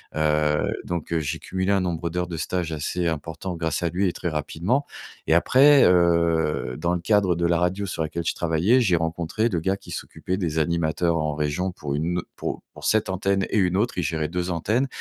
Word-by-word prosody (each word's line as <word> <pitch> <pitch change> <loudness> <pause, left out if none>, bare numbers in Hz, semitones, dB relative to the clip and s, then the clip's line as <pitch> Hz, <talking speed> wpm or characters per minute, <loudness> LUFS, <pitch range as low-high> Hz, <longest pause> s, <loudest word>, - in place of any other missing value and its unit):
heu, 75 -1 +1
donc 85 -2 -4
heu, 85 - +2
j'ai 70 -3 -3
cumulé 95 +1 -2
un 100 - +3
nombre 85 -2 -2
d'heures 90 +1 -2
de 85 -2 -5
stage 85 0 -2
assez 85 +3 -2
important 80 +3 -4
grâce 80 0 -2
à 85 - +1
lui 95 +3 0
et 85 - -1
très 90 - -3
rapidement 85 - -1 0.4
et 80 - +4
après, 135 +9 +6
heu, 85 -5 +2
dans 85 +3 0
le 90 - -3
cadre 100 -2 +2
de 85 0 0
la 85 -1 +2
radio 95 +3 0
sur 90 - -4
laquelle 80 +2 -3
je - - +1
travaillais, 85 +9 +2
j'ai 95 -7 +3
rencontré 85 +7 -1
le 85 -5 -1
gars 95 +4 0
qui - - -13
s'occupait 95 +1 -4
des 80 -5 -2
animateurs 85 +1 +1
en 75 -2 -1
région, 75 +5 -1
pour 75 -5 -5
une 85 +4 -1
au - - -5
pour - - -4
pour - - -10
cette 110 -3 +2
antenne 95 0 0
et - - 0
une 90 -1 +2
autre, 110 -1 0
il - - 0
gérait 80 0 -1
2 90 +1 -2
antennes 110 +10 0
85 Hz, 220 wpm, -24 LUFS, 80-95 Hz, 0.4 s, après